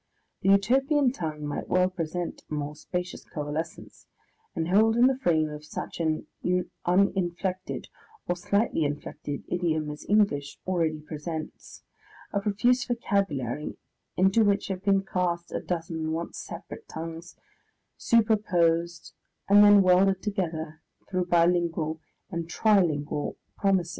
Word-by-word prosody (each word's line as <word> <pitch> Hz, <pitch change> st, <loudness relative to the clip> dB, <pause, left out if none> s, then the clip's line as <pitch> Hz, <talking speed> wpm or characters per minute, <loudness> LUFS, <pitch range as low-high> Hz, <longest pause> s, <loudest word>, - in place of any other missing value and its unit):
The 195 Hz, -, +2 dB
Utopian 260 Hz, +7 st, +4 dB
tongue 155 Hz, -, -4 dB
might 145 Hz, -, -4 dB
well 185 Hz, 0 st, +3 dB
present 175 Hz, -1 st, -4 dB
a -, -, -5 dB
more 150 Hz, 0 st, -3 dB
spacious 180 Hz, +4 st, -5 dB
coalescence, 155 Hz, +2 st, -6 dB, 0.5 s
and 165 Hz, +1 st, -1 dB
hold 220 Hz, +4 st, +4 dB
in 240 Hz, -, +6 dB
the 260 Hz, 0 st, +3 dB
frame 160 Hz, -8 st, +2 dB
of 150 Hz, 0 st, -8 dB
such 155 Hz, -, -6 dB
an 160 Hz, -2 st, 0 dB, 0.6 s
uninflected 185 Hz, 0 st, 0 dB, 0.4 s
or 175 Hz, -, +1 dB
slightly 200 Hz, 0 st, +1 dB
inflected 145 Hz, -1 st, -4 dB
idiom 160 Hz, -4 st, -1 dB
as 150 Hz, -, -9 dB
English 175 Hz, -10 st, +2 dB
already 165 Hz, -4 st, 0 dB
presents, 155 Hz, +1 st, -7 dB, 0.5 s
a 200 Hz, -, +2 dB
profuse 235 Hz, +5 st, +2 dB
vocabulary 195 Hz, -, -1 dB, 0.4 s
into 190 Hz, +5 st, +4 dB
which 200 Hz, -1 st, +1 dB
have 185 Hz, -1 st, -3 dB
been 195 Hz, -1 st, +3 dB
cast 175 Hz, -2 st, -1 dB
a -, -, -2 dB
dozen 165 Hz, -2 st, -3 dB
once 165 Hz, +2 st, -4 dB
separate -, -, -9 dB
tongues, 165 Hz, +1 st, -7 dB, 0.6 s
superposed 175 Hz, -7 st, +2 dB, 0.3 s
and 205 Hz, +1 st, +7 dB
then 205 Hz, -1 st, +8 dB
welded 190 Hz, +1 st, +4 dB
together 160 Hz, -6 st, -3 dB, 0.3 s
through 185 Hz, -1 st, 0 dB
bilingual 170 Hz, -2 st, +2 dB, 0.3 s
and 170 Hz, -2 st, -3 dB
trilingual 165 Hz, -8 st, +1 dB, 0.2 s
compromises. 190 Hz, -4 st, +2 dB
175 Hz, 125 wpm, -27 LUFS, 160-200 Hz, 0.6 s, then